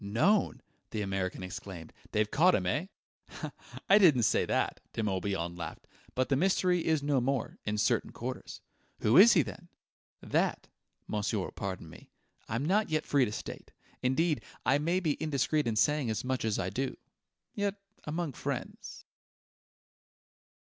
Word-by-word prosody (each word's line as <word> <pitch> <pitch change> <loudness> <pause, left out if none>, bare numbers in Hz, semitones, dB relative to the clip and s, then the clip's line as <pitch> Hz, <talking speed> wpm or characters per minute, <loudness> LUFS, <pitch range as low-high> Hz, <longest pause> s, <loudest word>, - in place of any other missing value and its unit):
"Known!" 120 - +2 0.3
the 105 - -2
American 95 -1 -2
exclaimed. 95 -3 -8 0.2
"They've 105 0 +1
caught 180 +5 +5
him, 90 - -1
eh?" 145 - 0 1.0
"I 200 +2 +7
didn't 150 - +6
say - - +3
that," - - 0
De 110 - -2
Morbihan 95 -4 -1
laughed; 80 -3 -7 0.3
"but 130 0 +1
the 135 - +3
mystery 180 +2 +2
is 160 -3 +1
no 145 -3 +2
more 130 -1 -1
in 105 0 0
certain 110 - +1
quarters." - - -6 0.4
"Who 110 - +3
is 210 +7 +9
he, 165 - +5
then?" 105 -5 -10 0.5
"That - - 0 0.4
monsieur 105 +1 -1
will 95 - -3
pardon 95 -4 -5
me 80 - -14 0.4
I'm 115 +6 -1
not 205 +5 +2
yet 155 0 0
free 140 -3 +3
to 105 - -4
state. - - -7 0.3
Indeed, 150 +5 +1 0.2
I 135 +2 +4
may 170 +5 +1
be 155 -4 -1
indiscreet 150 -1 +1
in 115 - 0
saying 145 +1 +2
as 110 +1 -2
much 130 -2 -1
as 110 -2 +1
I 90 0 -2
do. 135 0 -2 0.6
Yet, 200 -1 -1 0.3
among 155 -1 -3
friends..." - - -5
130 Hz, 155 wpm, -31 LUFS, 105-160 Hz, 1.0 s, is